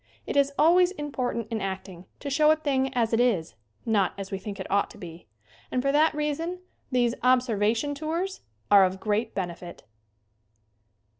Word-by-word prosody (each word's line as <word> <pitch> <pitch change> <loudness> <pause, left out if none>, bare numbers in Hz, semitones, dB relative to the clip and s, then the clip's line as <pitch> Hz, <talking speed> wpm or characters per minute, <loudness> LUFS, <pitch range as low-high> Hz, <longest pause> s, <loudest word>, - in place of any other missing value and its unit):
It - - -4
is 280 0 +3
always 350 +4 +5
important 255 - -3
in 220 -2 -2
acting 190 -2 -6 0.2
to 280 - -4
show 300 +2 +4
a 310 - +6
thing 270 -4 0
as 230 -2 +1
it 225 - +3
is, 200 - +1 0.3
not 205 -5 +2
as 195 -1 -7
we 195 - -3
think 200 0 -7
it 190 - -4
ought 200 +1 +1
to - - -14
be, 165 -5 -11 0.4
and 255 - -1
for 275 - +2
that 305 +2 +3
reason 300 +4 -2 0.3
these 240 -2 +2
"observation 245 0 +2
tours" 330 +6 -3 0.3
are 200 -1 +8
of 190 0 0
great 215 +2 -1
benefit. 175 -2 -6
240 Hz, 170 wpm, -26 LUFS, 195-290 Hz, 0.4 s, are